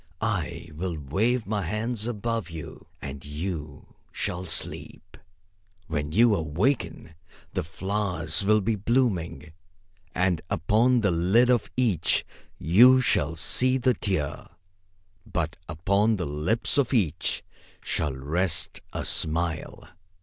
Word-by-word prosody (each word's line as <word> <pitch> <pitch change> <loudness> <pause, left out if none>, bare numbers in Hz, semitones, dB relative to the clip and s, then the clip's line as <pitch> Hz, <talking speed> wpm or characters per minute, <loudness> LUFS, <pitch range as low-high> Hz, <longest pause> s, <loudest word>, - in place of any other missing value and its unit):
I - - -2
will 85 +1 -3
wave 105 - 0
my 105 0 -1
hands 110 +5 -2
above 115 -2 -2
you, 80 -3 -9 0.2
and 70 0 -6
you 75 -1 -6 0.2
shall 90 +1 -3
sleep. 80 - -4 0.7
When 75 -2 -3
you 115 +5 +5
awaken 85 - -1 0.4
the - - -1
flowers 90 -1 -2
will 105 +2 +4
be 110 +4 +1
blooming; 95 - 0 0.6
and 90 -3 +1
upon 110 +8 +3
the 100 -3 +2
lid 95 +9 +4
of 120 -4 +1
each 105 -11 +2 0.3
you 120 - +6
shall 85 - +1
see 130 +10 +2
the 130 0 +2
tear, 95 -11 -2 0.8
but 85 -6 -2
upon 100 +8 +2
the 90 -4 -3
lips 80 - 0
of 135 -1 +1
each 85 -8 0 0.4
shall 75 - -1
rest 80 +7 -1
a - - -3
smile." 80 0 -1
95 Hz, 120 wpm, -26 LUFS, 80-115 Hz, 0.8 s, you